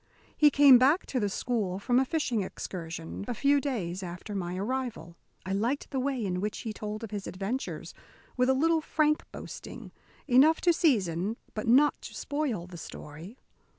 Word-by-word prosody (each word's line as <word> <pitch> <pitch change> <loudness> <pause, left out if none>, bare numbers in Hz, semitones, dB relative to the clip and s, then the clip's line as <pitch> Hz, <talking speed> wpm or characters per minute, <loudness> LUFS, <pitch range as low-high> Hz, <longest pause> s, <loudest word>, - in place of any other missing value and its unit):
He 300 - +6
came 280 -3 +8
back 285 +8 +4
to 255 - -2
the 205 -3 0
school, 200 -3 -2
from 245 +5 +2
a 265 - +2
fishing 255 -7 0
excursion, 165 -2 -6
a 245 - -2
few 280 +4 +3
days 195 -10 -3
after 180 +3 -7
my 180 -2 -3
arrival. 210 -6 -3 0.3
I 190 - -4
liked 235 +8 -1
the 270 - -1
way 260 -4 -1
in 180 -1 -2
which 210 +1 -3
he 220 - -4
told 215 +1 -6
of 220 - -6
his 205 -2 -5
adventures, 200 +8 -4 0.4
with 250 0 +2
a 265 - +4
little 325 +3 +2
frank 305 -1 +1
boasting, - - -9 0.4
enough 285 +5 +5
to 345 - +4
season 210 - +1 0.2
but 215 - -4
not 275 +6 +4
to - - -9
spoil 285 - -2
the 180 -1 -10
story. 160 - -10
230 Hz, 180 wpm, -29 LUFS, 190-275 Hz, 0.4 s, came